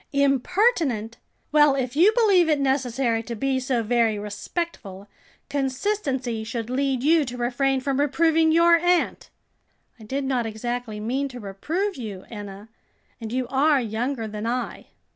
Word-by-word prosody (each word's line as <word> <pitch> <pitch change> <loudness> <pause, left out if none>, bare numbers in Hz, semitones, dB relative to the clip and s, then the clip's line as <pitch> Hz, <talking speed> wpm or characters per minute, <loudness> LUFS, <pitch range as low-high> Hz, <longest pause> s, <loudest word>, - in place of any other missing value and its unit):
"Impertinent! 280 - +1 0.3
Well, 295 -2 +5
if 255 -1 -3
you 360 +8 +6
believe 395 -8 +4
it 300 -2 +2
necessary 260 -4 0
to 235 +1 -6
be 265 +4 0
so 255 -3 -1
very 230 -1 +2
respectful, 205 - -5 0.4
consistency 265 - -2
should 230 +1 -5
lead 265 -1 0
you 320 +1 +4
to 250 -1 -6
refrain 260 +2 0
from 275 0 -1
reproving 320 +3 +3
your 335 +1 +5
aunt." 350 +1 0 0.7
"I - - -12
did 270 +6 -3
not 255 -4 -1
exactly 225 0 -4
mean 260 +6 -1
to 250 -2 -9
reprove 305 - -3
you, 210 -6 -7
Enna, 205 -1 -9 0.5
and 225 -2 -6
you 255 0 -1
are 280 +2 +3
younger 230 +1 -2
than 210 +1 -5
I." 245 +1 -3
260 Hz, 145 wpm, -24 LUFS, 230-295 Hz, 0.7 s, you